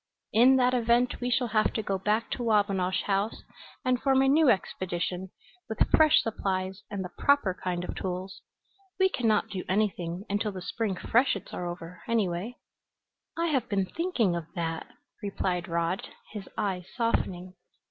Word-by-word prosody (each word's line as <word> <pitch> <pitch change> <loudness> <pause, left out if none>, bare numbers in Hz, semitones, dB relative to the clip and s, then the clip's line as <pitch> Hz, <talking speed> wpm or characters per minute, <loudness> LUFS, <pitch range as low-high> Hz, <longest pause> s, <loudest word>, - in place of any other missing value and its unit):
In 250 +4 +7
that 250 -1 +3
event 240 +1 +2
we 245 - 0
shall 245 -1 +1
have 215 0 +2
to 220 - -2
go 195 -1 -1
back 215 +4 0
to - - -3
Wabinosh 200 -5 +1
House 200 +2 -1 0.4
and 255 -1 +2
form 270 -1 +4
a - - +3
new 295 +1 +5
expedition, 185 -3 -1 0.4
with 220 - +2
fresh 310 -1 +6
supplies 190 -3 -2
and 195 -2 -4
the 180 - -7
proper 280 -10 +3
kind 180 -1 -3
of - - -4
tools. 185 +1 -4 0.6
We 380 0 +5
can 245 -10 -1
not 215 +1 +2
do 190 -3 -4
anything 190 -2 -1
until 205 +1 -1
the 185 - -6
spring 220 -2 -2
freshets 225 -1 +1
are 175 - -3
over, 175 0 -7
anyway." 210 0 0 0.8
"I 335 0 +1
have 270 -5 0
been 195 -3 +1
thinking 240 - 0
of 170 -2 -4
that," 165 -2 -3 0.3
replied 185 -3 -2
Rod, 170 +2 -1 0.3
his 205 -3 -7
eyes 185 -3 -2
softening. 185 -6 -1
200 Hz, 165 wpm, -28 LUFS, 185-235 Hz, 0.8 s, In